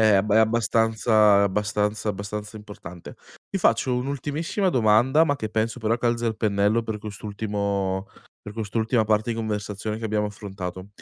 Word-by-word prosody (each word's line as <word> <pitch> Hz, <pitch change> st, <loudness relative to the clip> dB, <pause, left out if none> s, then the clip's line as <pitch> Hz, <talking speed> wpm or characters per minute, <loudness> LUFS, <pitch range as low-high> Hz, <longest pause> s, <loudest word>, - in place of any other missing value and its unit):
è 110 Hz, -2 st, +5 dB
abb 100 Hz, +2 st, +2 dB
è 110 Hz, -, +6 dB
abbastanza 110 Hz, -2 st, +3 dB
abbastanza 105 Hz, +1 st, 0 dB
abbastanza 105 Hz, +1 st, -5 dB
importante. 90 Hz, -5 st, -10 dB, 0.4 s
Ti 195 Hz, -, -1 dB
faccio 125 Hz, -5 st, +2 dB
un'ultimissima 145 Hz, +8 st, -1 dB
domanda, 125 Hz, +5 st, +4 dB
ma 145 Hz, -3 st, 0 dB
che 110 Hz, -5 st, -5 dB
penso 110 Hz, +3 st, -1 dB
però 115 Hz, +1 st, 0 dB
calzi 120 Hz, 0 st, 0 dB
al 110 Hz, -2 st, -1 dB
pennello 105 Hz, +1 st, +2 dB
per 110 Hz, -1 st, -4 dB
quest'ultimo 100 Hz, -2 st, -3 dB, 0.3 s
per 105 Hz, 0 st, -10 dB
quest'ultima 110 Hz, +1 st, 0 dB
parte 110 Hz, +1 st, +1 dB
di 115 Hz, -, -2 dB
conversazione 105 Hz, 0 st, -3 dB
che 115 Hz, -, -3 dB
abbiamo 105 Hz, -1 st, 0 dB
affrontato: 95 Hz, -2 st, -7 dB
110 Hz, 155 wpm, -24 LUFS, 105-115 Hz, 0.4 s, è